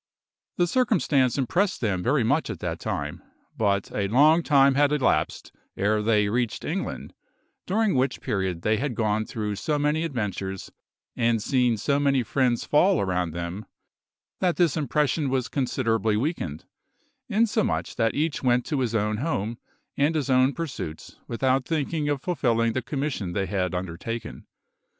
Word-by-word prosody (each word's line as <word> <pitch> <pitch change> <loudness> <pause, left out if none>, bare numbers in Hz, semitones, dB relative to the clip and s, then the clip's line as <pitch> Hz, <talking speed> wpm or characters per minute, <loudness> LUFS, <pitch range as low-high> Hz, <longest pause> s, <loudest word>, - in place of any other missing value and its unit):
The 175 - +3
circumstance 165 - +2
impressed 175 - +1
them 100 -6 -1
very 125 +5 +2
much 145 +8 +1
at - - -4
the - - -3
time, - - -4 0.3
but 100 -2 0
a 100 -1 0
long 150 +10 +5
time 140 -4 +4
had 145 +1 +3
elapsed 130 - 0 0.3
ere 105 +2 +1
they 105 -1 +2
reached 120 +1 -1
England, - - -4 0.5
during 215 +2 +2
which 130 -1 0
period 95 -7 -2
they 110 0 +2
had 130 +1 -2
gone 110 -1 0
through 105 -2 -3
so 150 +7 -1
many 150 +2 +1
adventures 100 - -4 0.4
and 115 -1 +2
seen 125 +1 +1
so 140 +7 +1
many 140 -3 +2
friends 125 0 0
fall 185 +5 +3
around 90 -3 0
them, 85 +5 -5 0.7
that 180 -2 +1
this 170 -6 +2
impression 150 0 0
was 130 -2 0
considerably 115 -5 0
weakened, 110 - -3 0.6
insomuch 220 +1 0
that 115 -2 +1
each 155 0 -1
went 125 -1 +2
to 150 -4 -1
his 120 -3 -1
own 105 0 0
home 120 -5 -2 0.4
and 145 +3 +2
his 140 -3 0
own 130 +1 +4
pursuits 130 - -6
without 130 +2 +1
thinking 155 -1 -1
of 145 -2 -1
fulfilling 115 -10 +1
the 130 - -1
commission 135 - -3
they 95 0 0
had 95 -2 -1
undertaken. 95 +6 -5
125 Hz, 155 wpm, -25 LUFS, 105-145 Hz, 0.7 s, long